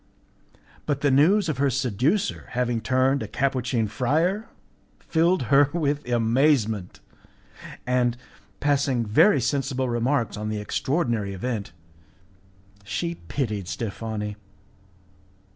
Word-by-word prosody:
But 140 -2 -1
the 145 - +3
news 175 +9 +4
of 150 -5 -2
her 140 0 +3
seducer 135 - 0
having 120 -2 0
turned 130 +2 +2
a 110 - -4
Capuchin 125 -3 0
friar 155 - 0 0.5
filled 170 -1 +1
her 140 0 +6
with 145 -5 -1
amazement, 115 -4 +1 0.9
and, 125 -1 +1 0.4
passing 135 -4 +1
very 135 - +5
sensible 130 +1 -1
remarks 120 -2 0
on 105 0 -3
the 110 - -2
extraordinary 115 - -1
event, 110 -1 -4 1.1
she 170 - -3
pitied 105 -9 -2
Steffani. 105 -1 -4
130 Hz, 105 wpm, -25 LUFS, 115-145 Hz, 1.1 s, her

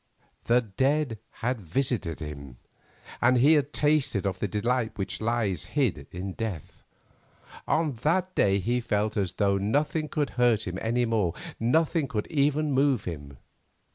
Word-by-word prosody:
The 120 +1 +4
dead 130 +3 0 0.3
had 125 -2 0
visited 95 - -1
him, 70 -5 -8 0.6
and 125 +1 +4
he 140 +6 +6
had 145 -1 +2
tasted 145 -10 +1
of 95 -1 -2
the 105 - -1
delight 110 +2 -1
which 95 +2 -4
lies 110 -7 0
hid 90 - +1
in 95 +2 -5
death. 100 -9 -6 0.8
On 155 -2 +1
that 180 +9 0
day 100 - +3
he 120 +6 0
felt 105 -1 -1
as 95 -4 -1
though 100 0 +1
nothing 145 +9 0
could 145 -2 -1
hurt 115 -3 +3
him 90 +1 -4
any 120 +2 +1
more, 105 -7 0 0.2
nothing 155 +5 +2
could 105 -4 -2
even 150 +1 +2
move 135 -4 +2
him. 70 -6 -7
115 Hz, 150 wpm, -27 LUFS, 95-140 Hz, 0.8 s, he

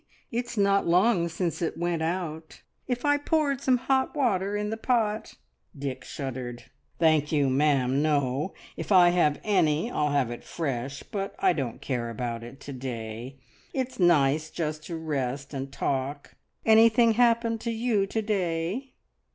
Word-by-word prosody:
It's 240 0 -3
not 200 -1 +3
long 180 0 +3
since 170 0 -2
it 165 - -2
went 170 -1 -1
out. 160 -2 -4 0.2
If 250 +1 -2
I 290 0 +4
poured 290 -2 0
some 260 -2 +3
hot 265 +3 0
water 205 -7 +1
in 210 0 -2
the - - -1
pot..." 225 -2 0 0.4
Dick 135 -2 -4
shuddered. 125 -3 -6 0.3
"Thank 155 -3 +3
you, 145 -4 +2
ma'am, 135 -1 +2
no! 145 +1 0 0.2
If - - -6
I 180 -2 +7
have 170 -4 +2
any, 185 0 +2
I'll 150 -8 +1
have 140 -4 +1
it 120 - -7
fresh, 135 -4 -4
but 195 -1 -5
I 185 -2 +3
don't 130 -8 -4
care 120 -3 -2
about 115 0 -4
it 120 +3 -10
to 140 - -7
day. 120 0 -6 0.4
It's 255 -2 -3
nice 155 -3 +3
just 155 -2 -3
to 170 - -5
rest 140 -3 -3
and 135 0 -4
talk. 140 +2 -3 0.3
Anything 230 +1 +6
happened 230 -1 +2
to 235 - -2
you 225 -3 +1
to 220 +3 -1
day?" 195 +4 -2
165 Hz, 160 wpm, -27 LUFS, 140-220 Hz, 0.4 s, I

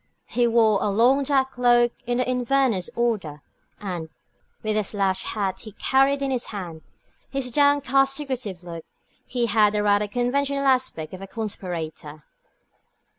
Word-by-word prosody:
He 245 -1 +1
wore 225 -3 +4
a 210 - +1
long 240 +7 +4
dark 270 -1 +1
cloak 240 -1 +3 0.2
of 245 0 0
the 255 - 0
Inverness 250 -5 +1
order, 195 -11 -1 0.4
and, 175 -5 -5 0.5
with 215 -1 0
the 215 - +2
slouch 195 -2 -1
hat 195 -3 -2
he 215 -3 -11
carried 275 +4 +2
in 270 - -1
his 250 -2 0
hand, 175 -6 -7
and - - -35 0.5
his 265 -2 -2
downcast, 275 -1 +3
secretive 255 - -4
look, 170 -2 -8 0.4
he 245 -2 0
had 210 -1 +3
the 210 0 0
rather 205 0 +3
conventional 275 +5 0
aspect 255 -13 0
of 185 - -8
a 195 - -7
conspirator. 165 -8 -6
230 Hz, 155 wpm, -24 LUFS, 195-260 Hz, 0.5 s, wore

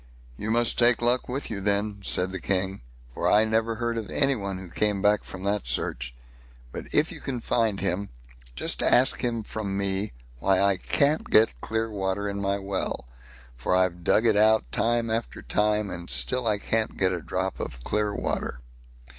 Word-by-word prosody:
"You 105 - -5
must 120 +1 +1
take 120 -1 +5
luck 120 +2 +1
with 135 +1 -4
you, 100 -2 -4
then", 100 +1 0
said 95 0 +2
the 95 - -4
King, 95 0 -1 0.3
"for - - 0
I 105 +1 +5
never 110 +1 0
heard 115 0 -2
of 110 - -7
any 140 -1 +3
one 100 -5 -4
who 95 0 -9
came 105 +3 0
back 105 +1 +2
from 95 0 -9
that 100 0 -1
search. 60 -1 -2 0.6
But - - -7
if - - +3
you - - -8 0.2
find 115 -3 0
him, 100 +4 -2 0.5
just - - -1
ask 130 +2 +4
him 115 -2 -1
from 100 -2 -4
me 100 +1 -1 0.3
why 95 +6 +2
I 100 -1 +3
can't 145 +10 +1
get 110 - +4
clear 110 0 -2
water 100 0 -2
in 100 0 -3
my 100 0 0
well; 95 -9 -3 0.5
for 60 +9 0
I've 90 -1 +1
dug 110 +6 +3
it 110 -2 +4
out 110 +1 +3
time 115 0 +1
after 115 +1 -3
time, 105 -1 +1
and 85 -1 -7
still 125 -2 +1
I 105 -2 +2
can't 110 +2 0
get 95 -1 +2
a 90 - -3
drop 95 +4 -3
of - - -6
clear 105 +5 0
water." 60 - -3
105 Hz, 190 wpm, -26 LUFS, 95-115 Hz, 0.6 s, take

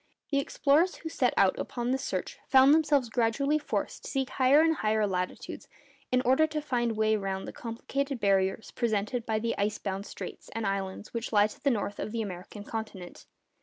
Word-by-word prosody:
The 280 - +3
explorers 300 +5 +2
who 320 - -7
set 250 -6 +1
out 190 -1 +4
upon 240 0 -2
this 265 0 -1
search - - -3
found 265 +2 +7
themselves 295 -5 +3
gradually 250 +6 +1
forced 295 - -3
to - - -6
seek 270 -2 -1
higher 265 +3 +5
and 320 -1 +3
higher 215 0 +1
latitudes 180 -2 -4 0.4
in 250 0 +3
order 265 +5 +4
to 310 -1 -3
find 245 -5 0
a - - -1
way 220 0 +2
round 195 -2 -3
the - - -7
complicated 270 +4 -3
barriers 195 +1 +1
presented 230 +1 -1
by 220 -1 +1
the 230 +1 -1
ice 210 +1 0
bound 195 +1 -4
straits - - -8
and 225 -1 -2
islands 195 +1 -3
which 230 0 -3
lie 205 -2 +5
to 215 - -7
the 280 - +4
north 205 -4 -2
of - - -3
the 230 -1 -1
American 195 +1 -7
continent. 210 -5 -7
230 Hz, 200 wpm, -29 LUFS, 205-270 Hz, 0.4 s, found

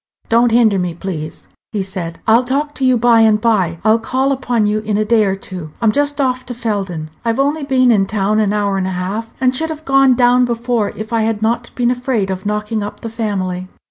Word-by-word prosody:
"Don't 235 +1 +4
hinder 225 -4 +4
me, 180 -2 -2
please," 165 -4 -6 0.3
he 205 -2 -1
said; 175 -3 -5
I'll 230 +3 +4
talk 285 +4 -1
to 270 - -5
you 255 -1 +4
by 235 0 +4
and 215 -1 +4
by. 200 -7 +1
I'll 220 +1 +4
call 260 +4 0
upon 245 -5 0
you 210 +1 +1
in 215 -1 -2
a 215 - +1
day 220 -1 +3
or 195 -1 0
two. 180 -5 -9
I'm 225 -2 +3
just 290 +4 0
off 255 -2 0
to 245 - -5
Felden. 195 -9 -3
I've 230 +1 -1
only 290 +3 +1
been 260 -3 +3
in 195 -3 +2
town 210 0 0
an 210 -2 +1
hour 200 -2 0
and 185 - -1
a 185 -1 -3
half, 205 +5 -3
and 255 -1 +2
should 320 +4 -1
have 315 0 -7
gone 270 -1 +4
down 245 0 +4
before 235 -2 -1
if 215 +2 -7
I 230 - +2
had 220 -1 -1
not 235 +2 0
been 245 -1 +1
afraid 245 -6 -1
of 190 +1 -4
knocking 210 +1 -2
up 205 - -6
the 230 - -6
family." 190 -5 -3
225 Hz, 235 wpm, -17 LUFS, 200-245 Hz, 0.3 s, Don't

